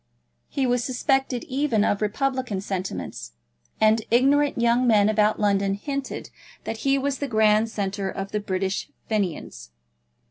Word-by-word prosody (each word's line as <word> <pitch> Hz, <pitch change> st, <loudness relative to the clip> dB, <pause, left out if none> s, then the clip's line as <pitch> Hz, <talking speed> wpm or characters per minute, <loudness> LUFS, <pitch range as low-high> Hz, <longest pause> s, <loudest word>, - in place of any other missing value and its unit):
He 270 Hz, -, -1 dB
was 245 Hz, -1 st, +1 dB
suspected 265 Hz, -1 st, 0 dB
even 260 Hz, -5 st, 0 dB
of 205 Hz, -, 0 dB
republican 255 Hz, 0 st, -1 dB
sentiments, 185 Hz, -, -5 dB, 0.5 s
and 220 Hz, +1 st, +4 dB
ignorant 280 Hz, +4 st, +3 dB
young 235 Hz, +2 st, +3 dB
men 210 Hz, -3 st, +5 dB
about 215 Hz, 0 st, +2 dB
London 200 Hz, -1 st, +2 dB
hinted 275 Hz, +5 st, -5 dB, 0.3 s
that 225 Hz, -, -4 dB
he 275 Hz, +4 st, +1 dB
was 275 Hz, 0 st, -1 dB
the 285 Hz, -, -2 dB
grand 215 Hz, -1 st, +3 dB
centre 200 Hz, -2 st, -3 dB
of 195 Hz, +1 st, -5 dB
the 210 Hz, -, -1 dB
British 190 Hz, -1 st, -2 dB, 0.2 s
Fenians. 175 Hz, -, -3 dB
220 Hz, 140 wpm, -24 LUFS, 200-260 Hz, 0.5 s, men